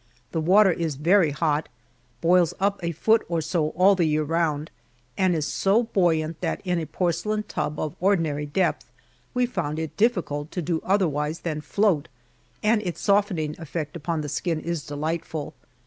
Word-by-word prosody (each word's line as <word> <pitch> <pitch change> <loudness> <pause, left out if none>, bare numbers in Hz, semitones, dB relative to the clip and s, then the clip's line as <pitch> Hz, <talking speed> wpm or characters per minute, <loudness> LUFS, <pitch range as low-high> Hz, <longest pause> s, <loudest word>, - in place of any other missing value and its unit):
The 160 - -1
water 190 +4 +5
is 165 -3 -2
very 170 +4 +4
hot 150 +1 0 0.5
boils 175 0 +3
up 200 +1 +1
a 170 0 -1
foot 220 +8 +3
or 170 -1 0
so 155 0 0
all 190 +2 +6
the 180 -3 +2
year 155 0 +1
round, 155 -1 -1 0.4
and 185 -2 +2
is 155 -2 -1
so 200 +9 +2
buoyant 165 -7 0
that - - -1
in 180 -1 +1
a 160 - -4
porcelain 185 +5 -1
tub 150 -5 -3
of 155 - -3
ordinary 165 -6 +1
depth 185 +6 -1 0.4
we 250 0 +3
found 170 -10 -3
it 160 -1 -4
difficult 175 -10 0
to 180 - -2
do 165 0 -1
otherwise 160 -5 0
than 155 -3 -3
float, 165 +1 +1 0.6
and 215 0 +3
its 180 -5 -4
softening 190 -7 +1
effect 160 0 -5
upon 165 0 -2
the 150 - -5
skin 165 +2 -1
is 170 -1 -4
delightful. 155 +1 -3
165 Hz, 170 wpm, -25 LUFS, 155-190 Hz, 0.6 s, all